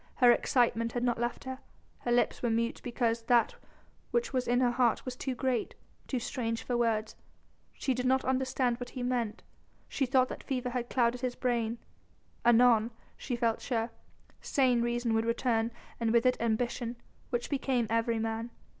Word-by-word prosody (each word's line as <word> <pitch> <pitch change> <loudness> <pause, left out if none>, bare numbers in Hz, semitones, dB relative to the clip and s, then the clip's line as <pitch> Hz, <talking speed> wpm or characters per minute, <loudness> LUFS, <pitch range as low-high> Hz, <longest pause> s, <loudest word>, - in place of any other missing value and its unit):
Her 245 -2 +6
excitement 230 -2 +2
had 245 - -1
not 240 -2 +1
left 240 0 -2
her, 260 0 -6 0.4
but - - -26
her - - +2
lips 240 0 +2
were 240 - +1
mute 230 +1 0
because 235 -1 0
that 240 -1 +3 0.6
which 475 -6 0
was 255 -1 0
in 245 +1 +3
her 250 -1 +3
heart 240 -2 +2
was 255 -1 -4
too 260 0 -3
great, 255 -2 -1 0.3
too 260 - -1
strange 230 -1 -3
for 245 - -2
words. 225 -2 0 0.6
She 265 - -1
did 250 +1 -1
not 260 +1 +2
understand 255 -2 0
what 245 - -6
he 255 - -5
meant; 245 -4 -1 0.4
she 270 - -1
still 260 +1 +4
thought 255 - 0
that - - -7
fever 250 -2 -2
had 245 -1 -3
clouded 245 -1 +1
his 250 -1 -2
brain; 235 -2 0 0.7
anon, 235 -1 +5 0.3
she 245 - -4
felt 230 -2 0
sure, 230 -2 -1 0.5
sane 255 -4 +2
reason 240 -1 0
would 225 0 +2
return 230 -1 +1 0.3
and 230 -1 +1
with 235 +1 +3
it 255 - +4
ambition, 235 +1 -1 0.3
which 240 +1 -2
became 265 -4 +1
every 230 0 +1
man. 225 +1 -2
240 Hz, 180 wpm, -30 LUFS, 230-255 Hz, 0.7 s, Her